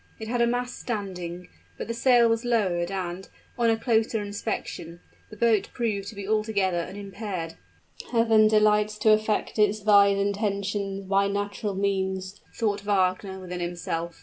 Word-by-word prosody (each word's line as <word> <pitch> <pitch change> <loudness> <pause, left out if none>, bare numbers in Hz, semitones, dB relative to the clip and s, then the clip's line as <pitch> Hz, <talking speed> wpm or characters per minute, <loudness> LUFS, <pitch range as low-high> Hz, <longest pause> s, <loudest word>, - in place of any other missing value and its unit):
It 220 - -7
had 240 +1 0
a 235 - +4
mast 245 +1 -2
standing, 180 -6 -5 0.3
but - - -5
the 230 - -2
sail 240 0 +4
was 230 +1 +1
lowered 190 -8 +1
and, 185 -1 -4 0.3
on 235 -2 +2
a 225 - +2
closer 225 -1 +1
inspection, 205 -5 -5 0.3
the 215 - -12
boat 220 -3 +2
proved 210 -4 -2
to 205 - -8
be 200 -1 -6
altogether 210 -4 +1
unimpaired. 195 -2 -5 0.6
"Heaven 225 -2 +5
delights 210 0 +3
to 215 +1 +4
effect 215 0 +1
its 210 0 +2
wise 200 -1 +5
intentions 200 -1 -2
by 195 +1 +3
natural 205 0 -3
means," 190 0 -2
thought 205 -3 0
Wagner 190 -1 0
within 180 -1 -6
himself. 170 -1 -4
205 Hz, 150 wpm, -26 LUFS, 190-220 Hz, 0.6 s, Heaven